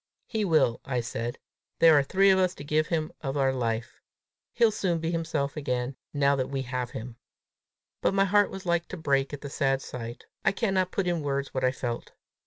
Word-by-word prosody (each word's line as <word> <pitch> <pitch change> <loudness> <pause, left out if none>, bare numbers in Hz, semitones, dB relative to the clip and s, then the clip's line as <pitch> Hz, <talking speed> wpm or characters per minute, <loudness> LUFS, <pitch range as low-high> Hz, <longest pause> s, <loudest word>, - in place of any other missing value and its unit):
"He 220 -3 -2
will," 155 -9 +3
I 125 -2 -1
said. 120 0 -4 0.4
"Here 165 -1 +8
are 145 - +6
three 195 +8 +4
of 190 - +4
us 185 -1 +2
to - - -9
give 155 +1 +1
him 160 -2 -1
of 135 -2 -2
our 135 -1 +2
life! 115 -3 -2 0.5
He'll 230 -2 +4
soon 185 -5 0
be 165 +1 -2
himself 160 -4 -1
again, 125 -3 -2 0.2
now 140 -1 +3
that 130 - -1
we 135 -1 -2
have 125 -1 -3
him!" 115 0 -7 0.8
But - - +2
my 195 0 +4
heart 205 +1 +4
was 195 0 -8
like 170 -1 +1
to 185 - -7
break 140 -4 +1
at 145 - -6
the 140 - -6
sad 135 -2 +1
sight. 120 -3 -7 0.2
I - - +3
cannot 190 -4 +1
put 195 - 0
in 175 -2 0
words 140 -1 -2
what 130 - -1
I 130 - +4
felt. 120 -2 -5
145 Hz, 210 wpm, -28 LUFS, 130-175 Hz, 0.8 s, Here